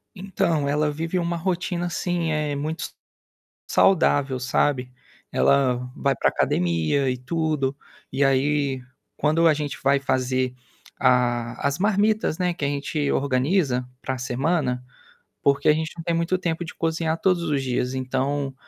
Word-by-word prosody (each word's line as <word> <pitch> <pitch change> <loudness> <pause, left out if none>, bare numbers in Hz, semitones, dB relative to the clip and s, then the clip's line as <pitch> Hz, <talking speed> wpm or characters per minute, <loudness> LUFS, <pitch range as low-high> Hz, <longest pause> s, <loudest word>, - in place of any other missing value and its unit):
Então 170 -6 0
ela 150 +1 +1
vive 165 +4 -2
uma 170 0 -1
rotina, 175 0 -1
assim, 175 -1 -1
eh, 150 -2 -1
muito 155 +3 -3 0.8
saudável, 145 -8 +3
sabe. 125 0 0 0.4
Ela 125 -2 +2
vai 140 -1 +1
para - - +2
academia 85 - +1
e 125 - -1
tudo, 145 0 -1 0.4
e, 135 +2 +1
aí, 135 0 +1 0.3
quando 155 +3 +3
a 155 - +6
gente 145 -1 -3
vai 140 +1 +4
fazer 130 -1 0 0.4
ah, 120 -1 +2
as 140 +3 -1
marmitas, 210 -2 +1
né, 180 -1 +1
que 155 - -3
a - - +2
gente 145 +1 -1
organiza 135 -1 +1
para 130 -1 -3
semana, 130 +1 -1 0.6
porque 140 0 +2
a 150 - +7
gente 160 +1 -2
não 165 - -6
tem 170 0 0
muito 170 +2 +1
tempo 175 -2 -2
de 165 - -9
cozinhar 160 0 -1
todos 180 -2 +2
os 145 -4 0
dias, 125 0 -1
então, 135 +2 -1
145 Hz, 150 wpm, -24 LUFS, 130-165 Hz, 0.8 s, a